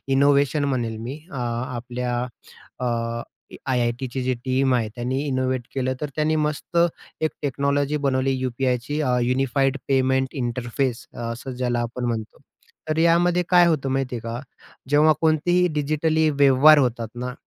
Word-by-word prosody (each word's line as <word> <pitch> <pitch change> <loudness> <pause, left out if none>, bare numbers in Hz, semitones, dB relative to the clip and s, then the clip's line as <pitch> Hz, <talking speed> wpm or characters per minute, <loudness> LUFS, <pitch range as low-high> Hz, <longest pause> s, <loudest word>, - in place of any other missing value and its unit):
Innovation 140 +1 +3
म्हणेल 120 -5 -1
मी 125 +7 -6
अ, - - -8 0.4
आपल्या 120 0 -3 0.6
अ, 125 - -2 0.9
IITची 125 +1 -1
जी 130 0 +1
team 130 0 +2
आहे 115 -3 0
त्यांनी 130 +3 -2
इनोव्हेट 130 -2 0
केलं, 130 -1 -1
तर 150 - -2
त्यांनी 155 +1 +1
मस्त 150 +3 -2 0.4
एक 155 - +2
टेक्नॉलॉजी 140 +1 0
बनवली 135 0 +1
UPIची 125 +3 -1
अ, 125 -3 +1
युनिफाईड 135 +2 +1
पेमेंट 130 -1 +2
इंटरफेस 120 0 -2
अ, - - -14
असं 130 +3 -6
ज्याला 125 -1 -1
आपण 120 +1 -4
म्हणतो. 115 -2 -4 0.5
तर 155 - 0
यामध्ये 170 +2 +3
काय 175 -1 +6
होतं 145 -5 0
माहिती 135 -2 -1
आहे - - -3
का? 115 +1 -5 0.5
जेव्हा 150 +2 +5
कोणतेही 175 +3 +3
डिजिटली 155 +2 +1
व्यवहार 145 +1 +6
होतात 120 -3 0
ना, 125 +1 -4
135 Hz, 145 wpm, -23 LUFS, 125-150 Hz, 0.9 s, काय